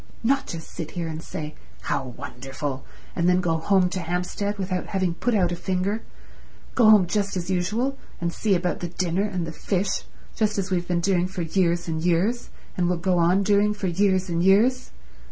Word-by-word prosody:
"Not 275 +4 +2
just 165 -1 -7
sit 160 -2 -5
here 170 -2 -4
and 160 0 -5
say 155 -2 -6 0.3
How - - -1
wonderful, 135 +1 -5 0.3
and 170 +1 +2
then 180 0 +4
go 165 -3 +1
home 185 +2 +3
to 185 - -3
Hampstead 180 +4 -2
without 185 -2 -2
having 190 -3 0
put 235 +6 0
out 180 -4 +2
a - - -1
finger—go 200 +4 -2
home 210 -4 +7
just 200 +2 -1
as 180 +1 -3
usual 220 +10 0 0.2
and 170 0 -1
see 205 -3 +1
about 180 0 -1
the 175 - -3
dinner 180 +1 -1
and 185 -5 -2
the 165 - -5
fish 190 +4 -1 0.3
just 215 -1 +1
as 195 -1 -2
we've 175 -1 0
been 175 -1 +1
doing 180 0 +2
for 185 -1 -4
years 170 +1 +1
and 160 -1 -2
years 180 +8 +1 0.3
and 175 -1 +1
will 180 - +1
go 180 +1 +1
on 180 +4 +4
doing 205 +1 +3
for 205 - -5
years 190 +1 +2
and 170 -1 0
years. 230 +7 +4
180 Hz, 195 wpm, -25 LUFS, 170-200 Hz, 0.3 s, home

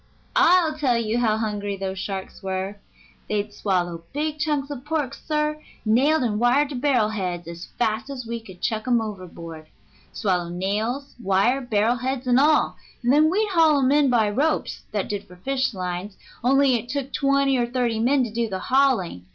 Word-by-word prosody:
I'll 345 -4 +4
tell 255 -5 +2
you 230 0 0
how 220 -3 +2
hungry 205 -2 -2
those 190 0 -4
sharks 190 -1 -5
were. 190 +1 -3 0.5
They'd 210 0 -1
swallow 175 -5 -1
big 305 +1 -2
chunks 295 -2 -1
of 265 -3 -6
pork, 295 -3 -2
sir, 300 0 -2 0.2
nailed 265 +7 +3
and 210 -3 0
wired 260 +5 +3
to 285 - -5
barrel 250 -5 +2
heads, 180 -5 -3
as 170 +1 -8
fast 220 +1 0
as 260 -3 -6
we 235 0 -4
could 190 -5 -14
chuck 220 +1 -1
'em 240 -2 +4
overboard; 170 -7 -7 0.4
swallow 180 -5 -1
nails, 215 +10 -2
wire, 200 +7 +2
barrel 230 0 +1
heads, 260 +1 -3
and 250 0 +4
all, 300 +2 +3 0.3
and 245 +2 +3
then 305 +2 +5
we'd 420 +4 +1
haul 325 -5 +4
'em 265 0 +3
in 290 -1 +4
by 230 -4 +3
ropes, 285 +10 0
that 205 -3 -2
did 205 -1 -4
for 180 - -14
fish 260 +8 -1
lines, 185 0 -5 0.3
only 270 +1 +4
it 240 0 -2
took 275 0 -3
twenty 275 -1 +2
or 240 -2 +1
thirty 240 -2 -1
men 260 +4 +3
to 230 -3 -4
do 230 -1 -1
the 190 - -3
hauling. 235 - +1
235 Hz, 185 wpm, -24 LUFS, 200-275 Hz, 0.5 s, then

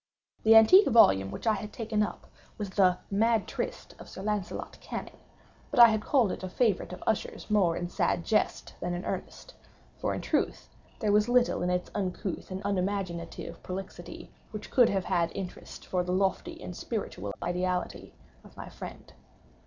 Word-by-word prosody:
The 225 +1 +6
antique 225 - +8
volume 95 - +5
which 100 - -7
I 220 - +4
had 210 0 -5
taken 220 -2 -2
up 210 - -3 0.3
was 205 -3 -4
the 185 -2 +4
"Mad 225 +1 +2
Trist" - - -5
of - - -11
Sir 190 - -8
Launcelot 210 -3 -3
Canning; - - -7 0.5
but 255 - -1
I 235 -1 +11
had 215 -1 0
called 240 -5 +2
it - - -5
a 185 - -5
favorite 210 -3 +1
of 180 - -8
Usher's 220 -1 -2
more 185 -6 +3
in 175 - -3
sad 175 -1 0
jest 215 - 0
than 175 0 -2
in 175 - -5
earnest; - - -6 0.5
for, - - -1
in - - -4
truth, - - -1 0.3
there 210 -3 +2
is 210 +2 +3
little 245 0 +3
in 180 - 0
its 180 0 -1
uncouth 190 -2 -3
and 190 0 -5
unimaginative 180 -4 -3
prolixity 190 +1 -8 0.2
which 215 - -8
could 245 -3 +5
have 195 -2 -1
had 170 -1 +1
interest 185 -2 -7
for 180 -1 0
the 180 - -3
lofty 190 0 0
and 180 - -7
spiritual 105 - -4
ideality 180 +1 -2 0.3
of - - -17
my - - -8
friend. - - -10
195 Hz, 175 wpm, -29 LUFS, 180-220 Hz, 0.5 s, I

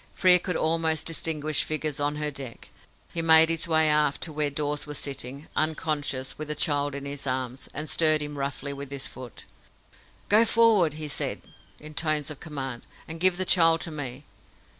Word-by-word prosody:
Frere 180 -1 +6
could 180 0 -3
almost 160 -1 0
distinguish 155 -2 0
figures 155 -2 -3
on 145 +1 0
her 150 0 -2
deck. 135 -4 -9 0.4
He 165 - -1
made 160 0 +7
his 165 0 +1
way 160 -1 +3
aft 150 -2 +2
to 160 - -4
where 150 -1 0
Dawes 145 +1 -2
was 150 -1 -4
sitting, 140 +1 -4
unconscious, 150 -4 -2
with 155 - -5
the 150 - -3
child 145 -2 +1
in 140 0 -6
his 140 0 -5
arms, 130 0 -3
and 150 +1 -4
stirred 155 +1 +4
him 150 0 -5
roughly 140 0 -4
with 140 -1 -8
his 140 -1 -4
foot. 125 -2 -10 0.8
"Go 215 +2 +5
forward," 220 -9 +3
he 155 0 -5
said, 145 - -3 0.4
in 155 0 -11
tones 155 -1 -1
of 150 - -10
command, 135 -6 -6 0.2
"and 165 +1 -7
give 185 0 +4
the 185 - -1
child 165 -3 +4
to 165 - -2
me." 140 -2 -6
150 Hz, 185 wpm, -26 LUFS, 140-160 Hz, 0.8 s, made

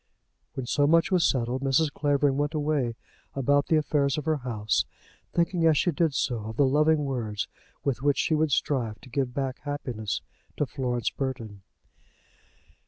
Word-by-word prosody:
When 130 - -3
so 145 +3 +2
much 165 +4 +4
was 180 -2 +3
settled, 125 0 -1
Mrs. 140 +3 +2
Clavering 145 -2 +2
went 145 +2 -1
away 145 -6 0 0.4
about 140 +1 +2
the 160 - +3
affairs 145 -2 +1
of 150 - -3
her 160 -1 +2
house, 110 -5 0 0.5
thinking 170 0 +1
as 155 -2 +4
she 175 - +2
did 160 -2 +1
so 125 -2 0
of 110 +1 -6
the 140 - +5
loving 150 +2 +3
words 115 -6 -2 0.4
with 135 -3 -1
which 145 0 +2
she 185 - +1
would 155 -1 +2
strive 120 -6 0
to - - -14
give 130 -1 -1
back 135 -2 -2
happiness 125 -8 -4 0.3
to 150 - +1
Florence 125 -3 -2
Burton. 115 -7 -5
140 Hz, 170 wpm, -27 LUFS, 125-150 Hz, 0.5 s, the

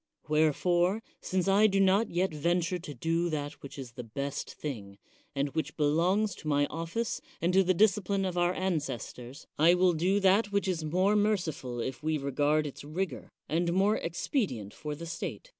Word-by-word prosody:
Wherefore, 175 +6 +2 0.2
since 185 0 -1
I 200 +2 +5
do 195 -1 +1
not 195 +3 +4
yet 180 0 0
venture 175 +3 0
to 155 -4 -8
do 165 +6 0
that 145 -1 -4
which 140 - -10
is 130 -3 -7
the 125 +1 -8
best 140 +5 -4
thing, 105 -9 -6 0.4
and 140 +1 0
which 150 0 -3
belongs 175 +8 +2
to 155 - -9
my 145 -1 +3
ofl5ce 165 +8 -3 0.2
and 175 +2 +1
to 190 - +6
the 185 0 +2
discipline 200 -1 +2
of 185 -2 -2
our 175 0 +2
ancestors, 140 - -4
I 170 +3 +6
will 180 0 +4
do 180 +5 +2
that 200 +2 +3
which 200 -1 0
is 175 -4 -1
more 185 +6 +2
merciful 170 - 0
if 130 +3 -4
we 155 0 0
regard 145 +2 +1
its 140 - -7
rigor, 155 - -4 0.2
and 170 +2 0
more 195 +3 +3
expedi 180 - -1
ent 100 0 -10
for 150 -1 -5
the 165 +3 -8
State. 170 - -6
170 Hz, 185 wpm, -30 LUFS, 145-190 Hz, 0.4 s, to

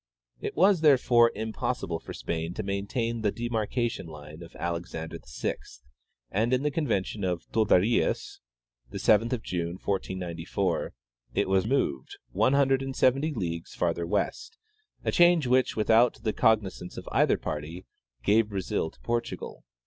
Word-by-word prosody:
It - - -5
was, 190 -2 +4
therefore, 125 -6 +5
impossible 110 -4 -3
for - - -10
Spain 80 +1 -4
to 110 - -3
maintain 105 +4 -2
the 105 -2 +1
demarcation 120 -2 -2
line 75 +1 -10
of 85 0 -12
Alexander 85 -1 -4
VI, 65 -1 -3 0.7
and 110 +5 +1
in 130 +1 +2
the 150 - +1
con 150 +1 -1
vention 100 -1 -1
of 90 -2 -1
Torderillas 110 0 +2 0.5
(7th 115 +3 +2
June, 85 -1 -2
1494) 95 -3 -2 0.4
it - - +2
was 95 +1 +2
moved 70 - -1
one 110 +8 +2
hun 140 -1 +4
dred 135 0 +3
and 135 -1 -4
seventy 135 +5 +2
leagues 85 - -4
farther 85 -1 -1
west, 440 - -2 0.5
a - - +2
change 175 -3 +5
which, 125 +1 +2
without 110 +2 +4
the 110 - 0
cognizance 105 -5 +1
of - - -8
either - - +3
party, 80 +4 -5 0.4
gave 105 +1 +3
Brazil 95 -5 -2
to - - -24
Portugal. 120 0 -4
110 Hz, 145 wpm, -28 LUFS, 90-125 Hz, 0.7 s, therefore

